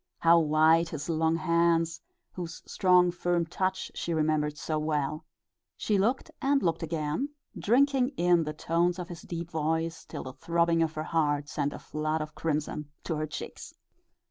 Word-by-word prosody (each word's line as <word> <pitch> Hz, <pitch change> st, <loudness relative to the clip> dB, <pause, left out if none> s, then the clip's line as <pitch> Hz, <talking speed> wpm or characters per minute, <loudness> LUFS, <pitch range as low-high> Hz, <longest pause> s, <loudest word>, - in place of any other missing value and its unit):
How 170 Hz, 0 st, +6 dB
white 160 Hz, +1 st, +4 dB
his 155 Hz, 0 st, -5 dB
long 160 Hz, 0 st, +2 dB
hands, 165 Hz, 0 st, +2 dB, 0.3 s
whose 170 Hz, -2 st, -7 dB
strong, 180 Hz, -2 st, +4 dB
firm 175 Hz, -1 st, 0 dB
touch 185 Hz, +3 st, -2 dB
she 170 Hz, -, -2 dB
remembered 150 Hz, -1 st, +1 dB
so 155 Hz, 0 st, -2 dB
well! 155 Hz, 0 st, -1 dB, 0.5 s
She 205 Hz, -2 st, +1 dB
looked 235 Hz, +7 st, 0 dB
and 275 Hz, 0 st, +2 dB
looked 165 Hz, -2 st, +1 dB
again, 160 Hz, -, -2 dB, 0.3 s
drinking 265 Hz, +3 st, +2 dB
in 175 Hz, -1 st, +4 dB
the 155 Hz, -, -3 dB
tones 170 Hz, +3 st, +1 dB
of 180 Hz, -2 st, -6 dB
his 170 Hz, -2 st, -8 dB
deep 170 Hz, 0 st, -6 dB
voice, 160 Hz, +1 st, -1 dB
till 150 Hz, -, -7 dB
the 130 Hz, -, -7 dB
throbbing 170 Hz, +4 st, +1 dB
of 160 Hz, -1 st, +1 dB
her 155 Hz, -, -2 dB
heart 145 Hz, -3 st, 0 dB
sent 145 Hz, -1 st, -1 dB
a -, -, -7 dB
flood 155 Hz, +1 st, -2 dB
of 155 Hz, -, -10 dB
crimson 150 Hz, -1 st, -2 dB
to 165 Hz, -, -2 dB
her 155 Hz, 0 st, -2 dB
cheeks. 155 Hz, -, -8 dB
165 Hz, 170 wpm, -29 LUFS, 155-175 Hz, 0.5 s, How